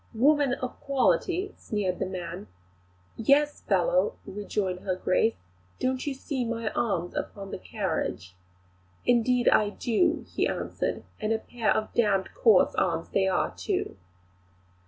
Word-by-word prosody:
"Woman 280 +1 +4
of 255 -2 -6
quality!" 340 +7 +1
sneered 195 -4 -2
the - - -1
man. 175 - -6 0.7
"Yes, 285 +6 +3
fellow," - - +2
rejoined 195 -2 -3
her 185 -1 -2
Grace, 185 +5 +2 0.4
"don't 260 +2 -1
you 280 - -1
see 265 -1 -3
my 230 -1 -2
arms 180 -7 -1
upon 195 -1 -5
my - - -5
carriage?" 165 - -3 0.7
"Indeed 245 +1 +3
I 210 - +4
do," 310 - +1
he - - 0
answered, - - -3 0.2
"and 215 +1 -1
a 225 - +3
pair 230 0 -3
of 215 - -1
d 235 - +4 0.3
coarse 485 -3 +5
arms - - 0
they 190 -1 +2
are, 185 - +1
too!" - - -2
230 Hz, 135 wpm, -27 LUFS, 195-275 Hz, 0.7 s, coarse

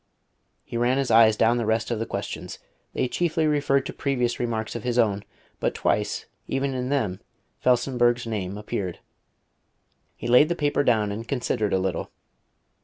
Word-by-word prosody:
He 120 - -5
ran 120 +2 +2
his 135 -2 0
eyes 110 -1 +6
down 115 +2 +3
the 120 - -1
rest 110 +1 0
of 115 - -1
the 115 - -3
questions. - - -5 0.4
They 130 - 0
chiefly 160 +3 0
referred 145 -3 +2
to - - -5
previous 125 -4 -1
remarks 115 -2 -2
of 120 - -3
his 120 -1 -1
own, 105 -4 +2 0.4
but - - -1
twice, - - 0 0.2
even 135 0 -1
in 125 0 -2
them, 110 -10 0 0.4
Felsenburgh's 120 -1 +2
name 100 -4 -3
appeared. 100 -4 -4 1.2
He - - -9
laid 125 +6 +6
the 175 - 0
paper 145 -2 +1
down 110 -5 +2
and 110 +3 -6
considered 120 -6 -1
a - - +3
little. 95 -2 -2
120 Hz, 170 wpm, -25 LUFS, 110-135 Hz, 1.2 s, eyes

